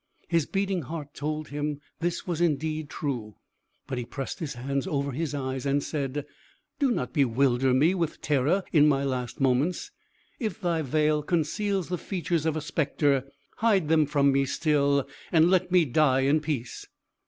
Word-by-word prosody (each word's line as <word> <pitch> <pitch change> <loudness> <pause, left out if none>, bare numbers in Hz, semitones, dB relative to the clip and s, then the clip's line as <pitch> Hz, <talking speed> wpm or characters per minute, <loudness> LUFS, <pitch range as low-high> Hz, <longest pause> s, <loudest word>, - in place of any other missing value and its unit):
His 165 -3 +1
beating 195 -2 -1
heart 150 -1 -7
told 155 0 -4
him 145 0 -3 0.2
this 175 +1 -2
was 175 -2 -2
indeed 155 -2 0
true; 120 -10 -4 0.5
but 130 -2 -3
he - - -3
pressed 130 +3 -6
his 150 -4 -4
hands 135 +2 -2
over 140 -1 -1
his 150 +2 -3
eyes, 130 -2 -3
and 140 0 +1
said: 145 -1 -3 0.5
"Do 280 -2 +3
not 240 - -2
bewilder 130 -2 +2
me 145 +8 +4
with 170 -4 -2
terror 150 +7 +1
in 150 -2 +6
my 140 -2 +2
last 125 -3 -3
moments. 140 - +1 0.5
If 215 - -3
thy 170 -4 0
veil 150 +2 +1
conceals 180 +4 -1
the 180 -1 -2
features 170 -4 -1
of 160 - 0
a - - -2
spectre, 145 -4 +1 0.3
hide 200 -8 +2
them 155 -2 +4
from 140 -1 +3
me 135 0 +2
still, 140 -1 +1 0.2
and 165 +1 +5
let 185 -1 +2
me 180 -3 +5
die 135 -1 +3
in 140 +4 +3
peace." 145 -6 -4
150 Hz, 170 wpm, -27 LUFS, 140-165 Hz, 0.5 s, in